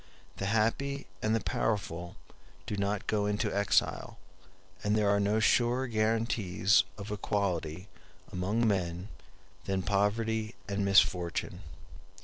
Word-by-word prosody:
The 95 - -2
happy 115 +7 0 0.2
and 110 +1 +1
the - - +2
powerful 90 -5 -2 0.5
do - - -3
not 100 0 -1
go 105 -1 0
into 105 0 -1
exile, 100 0 +1 0.7
and 105 +1 +2
there 105 -1 +2
are 100 - +3
no 105 +2 +2
surer 120 +3 +3
guarantees 110 -4 +2
of 100 0 -7
equality 95 -4 -2 0.4
among 100 +6 0
men 90 -1 -1 0.6
than 95 -1 -1
poverty 110 +3 0
and 100 0 -1
misfortune. 90 -3 +2
105 Hz, 120 wpm, -30 LUFS, 95-110 Hz, 0.7 s, are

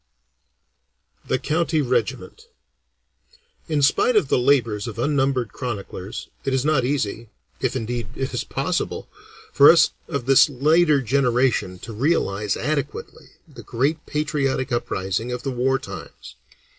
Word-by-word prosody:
THE - - +1
COUNTY 160 +4 0
REGIMENT 130 - -2 1.2
In 150 -3 0
spite 225 - +3
of 185 -10 +3
the - - +3
labors 120 -6 +2
of 115 - -7
unnumbered 135 -3 0
chroniclers, 100 -5 -6 0.2
it 135 - 0
is 130 +1 0
not 150 -4 +2
easy, 120 -4 -2 0.3
if 130 0 -1
indeed 120 -2 -3
it 135 - -3
is - - -2
possible, - - -3 0.5
for 140 - +8
us 165 -2 +4 0.2
of 140 -7 -3
this 135 +2 +6
later 150 +2 +3
generation 125 -6 +1
to 115 - -8
realize 105 - 0
adequately 145 0 -4
the - - -12
great 145 +6 -1
patriotic 140 -3 -1
uprising 115 -1 -2
of 125 +1 -4
the 135 - -2
war 130 +2 +1
times. - - -10
130 Hz, 130 wpm, -22 LUFS, 120-145 Hz, 1.2 s, for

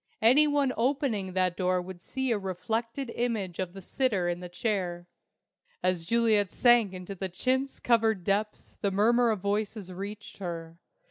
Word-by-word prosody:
Any 270 +7 +6
one 285 -3 +2
opening 235 -6 0
that 185 -1 +1
door 185 0 +1
would 180 0 -8
see 265 +3 -2
a 220 - +1
reflected 230 +7 -3
image 220 -8 -2
of 185 -2 -2
the 195 -1 -10
sitter 205 -6 +1
in 175 0 -2
the 180 0 -8
chair. 175 -3 -2 0.8
As 180 -2 +1
Juliet 220 -3 +3
sank 240 -5 +4
into 185 +1 -7 0.2
chintz 260 +8 -1
covered 225 -5 +2
depths 205 +3 -2
the 200 - +2
murmur 230 +5 +3
of 215 -4 -1
voices 205 -1 -2
reached 200 +3 -7
her. 170 -3 -6
205 Hz, 155 wpm, -29 LUFS, 185-235 Hz, 0.8 s, Any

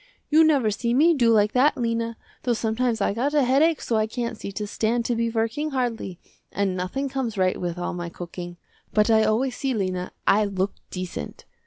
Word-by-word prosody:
You 315 +2 +7
never 280 -9 +3
see 235 +3 -1
me 325 +5 +5
do 245 -6 +3
like 210 -1 +4
that 280 +4 +3
Lena, 230 -1 -1 0.2
though 245 - +1
sometimes 225 0 0
I 200 - +1
got 270 +7 -1
a 290 - +4
headache 285 +5 +3
so 230 - 0
I 215 0 +1
can't 235 +1 -3
see 200 - -7
to 210 +1 -3
stand 230 +3 -1
to 240 - 0
be 230 0 0
working 230 +7 -1
hardly, 235 - -3 0.3
and 195 -2 0
nothing 185 +10 -2
comes 260 -5 -3
right 185 -1 +1
with 175 -1 -3
all 175 - -3
my 175 -1 -4
cooking, 175 0 -8 0.4
but 210 +1 +4
I 220 0 +5
always 245 +4 +1
see 270 -3 -1
Lena, 185 -3 -2
I 210 +1 +4
look 195 -1 -1 0.2
decent. 180 - -6
225 Hz, 205 wpm, -24 LUFS, 200-255 Hz, 0.4 s, You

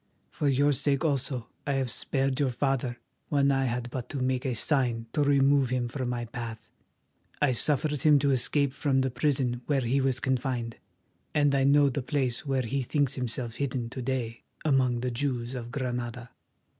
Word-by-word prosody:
For 145 - -1
your 145 +2 +3
sake 140 +2 0
also 130 -5 -1 0.2
I 140 - +1
have 135 -3 0
spared 135 -1 -1
your 140 -2 +2
father 125 -1 -1 0.3
when 140 -1 +3
I 135 -1 +2
had 120 0 -2
but 125 -3 -5
to 140 - -3
make 130 +1 0
a 125 - -1
sign 120 -3 +1
to 150 - +1
remove 140 -2 +4
him 125 -1 0
from 125 0 -3
my 120 -1 -2
path. 115 -1 -7 0.7
I 145 -3 +3
suffered 145 +3 +2
him 150 -2 +6
to 140 0 +2
escape 135 +2 +1
from 140 -2 +1
the 130 0 0
prison 125 -1 0
where 140 -3 +2
he 130 +3 +1
was 130 -2 +1
confined, 125 -3 -1 0.6
and 145 -2 +3
I 135 -1 +3
know 140 0 +5
the 135 +2 -2
place 130 0 -1
where 135 -1 +1
he 135 +4 -1
thinks 140 +1 0
himself 120 -2 -3
hidden 125 -4 -2
to 130 - -5
day 120 -3 -3 0.2
among 130 -5 +2
the 125 0 -1
Jews 125 -1 -2
of 120 -2 -5
Granada. 125 -2 -4
130 Hz, 185 wpm, -28 LUFS, 120-140 Hz, 0.7 s, him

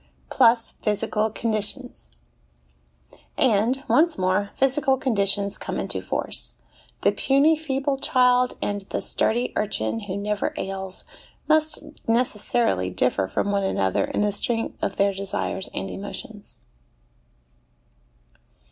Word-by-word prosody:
Plus 235 -2 +4
Physical 215 +1 -1
Conditions. 215 - -3 1.3
And, 245 +3 +2
once 330 +2 +3
more, 185 +2 +1
physical 270 0 +2
conditions 200 -5 0
come - - -4
into - - 0
force. - - -1 0.5
The - - +4
puny, 280 +4 +3
feeble 275 -2 -2
child 250 -2 +3
and 205 0 -2
the - - -1
sturdy 240 +3 +1
urchin 200 - -1
who 200 -3 -5
never 205 0 -2
ails 190 -1 -3 0.4
must 310 0 +2 0.2
necessarily 225 - +1
differ 95 0 +1
from 200 - -1
one 200 -1 +1
another 95 - +1
in - - -2
the 210 0 +2
strength 225 +3 -1
of - - -2
their 200 0 +2
desires 195 0 -2
and 195 - -5
emotions. 205 +1 -8
215 Hz, 115 wpm, -24 LUFS, 200-255 Hz, 1.3 s, Plus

